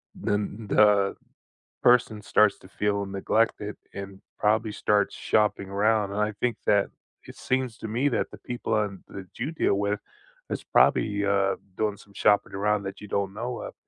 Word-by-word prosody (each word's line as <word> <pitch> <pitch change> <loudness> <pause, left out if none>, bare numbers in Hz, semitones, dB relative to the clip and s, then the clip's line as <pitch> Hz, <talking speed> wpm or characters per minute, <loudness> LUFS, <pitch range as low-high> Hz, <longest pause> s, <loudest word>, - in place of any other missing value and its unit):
then 105 +1 -2
the 100 -2 +4 0.7
person 120 -3 +4
starts 105 0 +3
to 95 - -15
feel 100 0 -1
neglected, 105 +2 0 0.2
and 100 -1 -8 0.2
probably 110 +1 +1
starts 105 0 +1
shopping 105 -2 +1
around, 105 +1 +1
and 105 - -2
I 105 0 +1
think 125 -2 0
that 100 -1 +3 0.4
it - - -11
seems 130 -3 -1
to 110 - -6
me 125 +6 +1
that - - -1
the - - -11
people 120 -2 -3
and 100 -3 -3
that 95 -1 -8
you 130 +6 -2
deal 155 - +1
with 100 +1 -1 0.5
is - - -3
probably, 100 -1 +3
uh, 100 -1 +2 0.2
doing 105 -2 0
some 100 0 -18
shopping 105 0 +3
around 105 +1 0
that 95 +1 -6
you 105 - -9
don't 100 0 -1
know 120 +2 -4
of - - -7
105 Hz, 175 wpm, -26 LUFS, 100-110 Hz, 0.7 s, the